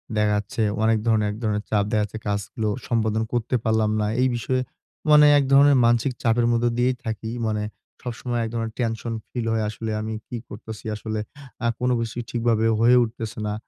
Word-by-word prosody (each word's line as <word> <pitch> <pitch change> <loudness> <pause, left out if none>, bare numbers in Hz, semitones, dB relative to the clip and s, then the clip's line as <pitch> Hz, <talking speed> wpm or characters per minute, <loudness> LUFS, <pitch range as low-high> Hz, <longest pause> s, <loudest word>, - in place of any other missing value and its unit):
দেখা 105 0 +2
যাচ্ছে, 105 +2 -3 0.2
অনেক 110 0 +4
ধরনের 110 -2 +2
এক 105 - -7
ধরনের 105 -1 0
চাপ 105 -2 +2
দেখাচ্ছে 105 -1 0
কাজগুলো 105 +2 -2 0.2
সম্পাদন 110 -2 +1
করতে 120 +1 0
পারলাম 110 -1 +2
না। 105 - +1
এই 130 - +4
বিষয়ে 130 +2 -1 0.5
মানে 150 0 +8
এক 140 - +3
ধরনের 140 +1 +7
মানসিক 120 +2 +2
চাপের 115 0 +3
মধ্যে 120 0 +2
দিয়েই 125 +1 +2
থাকি। 110 0 -4 0.2
মানে 105 -1 -1 0.4
সবসময় 120 0 -3
এক 110 - -3
ধরনের 115 -1 -2
টেনশন 115 -1 -2 0.2
ফিল 120 -2 -3
হয় 110 - 0
আসলে, 110 +1 -5
আমি 110 +1 -4
কি 120 - -5
করতাছি? 110 +1 -9
আসলে 110 0 -4 0.5
আ - - +3
কোন 125 0 +1
কিছুই 115 +1 -3
ঠিকভাবে 115 -2 +1
হয়ে 120 +2 +6
উঠতেছে 110 -1 -5
না। 105 - -1
115 Hz, 185 wpm, -24 LUFS, 110-120 Hz, 0.5 s, মানে